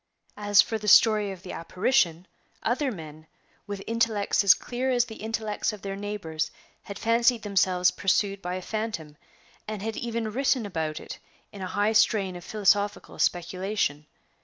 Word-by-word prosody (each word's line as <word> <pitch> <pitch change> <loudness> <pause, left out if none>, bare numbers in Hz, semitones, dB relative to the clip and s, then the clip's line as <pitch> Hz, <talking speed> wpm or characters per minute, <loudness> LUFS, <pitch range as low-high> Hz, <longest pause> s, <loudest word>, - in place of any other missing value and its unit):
As 205 -1 +5
for 220 - -3
the 210 - -6
story 210 -1 +6
of 185 -2 -10
the 185 - -7
apparition, 180 -1 +1 0.4
other 260 +4 0
men, 155 -5 -10 0.4
with 200 -1 -5
intellects 225 -3 +1
as 200 - +7
clear 250 +2 -3
as 245 -2 +3
the 220 -2 -10
intellects 220 -1 -2
of 210 - -10
their 195 -1 -4
neighbors 195 -6 -3 0.3
had 200 - -8
fancied 230 0 +2
themselves 185 -3 +2
pursued 195 0 0
by 180 0 -3
a 185 - -5
phantom, 215 -10 -4 0.5
and 210 -2 -5
had 225 0 -3
even 230 -2 -3
written 260 -1 +1
about 160 -5 -3
it - - -9 0.3
in 200 - -10
a 185 - -3
high 205 +4 +1
strain 210 -4 +3
of 175 - -9
philosophical 205 0 0
speculation. 175 -4 -1
205 Hz, 160 wpm, -26 LUFS, 185-225 Hz, 0.5 s, as